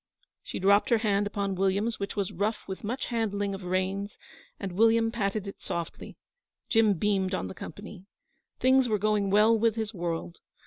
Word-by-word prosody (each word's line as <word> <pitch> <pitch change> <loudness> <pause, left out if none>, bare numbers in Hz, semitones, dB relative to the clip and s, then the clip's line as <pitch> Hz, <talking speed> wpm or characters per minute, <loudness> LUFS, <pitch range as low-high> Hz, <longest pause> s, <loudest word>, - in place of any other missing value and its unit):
She - - -6
dropped 200 +2 +4
her 235 - +5
hand 205 -2 +1
upon 200 -1 -2
William's, 195 +4 0
which 200 - -4
was 200 -3 -1
rough 205 +5 -2
with 190 -1 -6
much 245 +6 -3
handling 205 -3 -1
of 195 - -6
reins, 190 +2 -2 0.4
and 195 - -4
William 225 +4 +3
patted 210 -2 -1
it 200 - -8
softly. 170 -1 -5 0.5
Jim 225 -2 +4
beamed 195 0 0
on - - -3
the - - -7
company. 200 -1 -9 0.5
Things 260 -1 +4
were 215 - +2
going 205 -1 +1
well 210 +3 +5
with 225 0 +2
his 220 -1 -3
world. 170 -2 -4
205 Hz, 175 wpm, -28 LUFS, 195-220 Hz, 0.5 s, her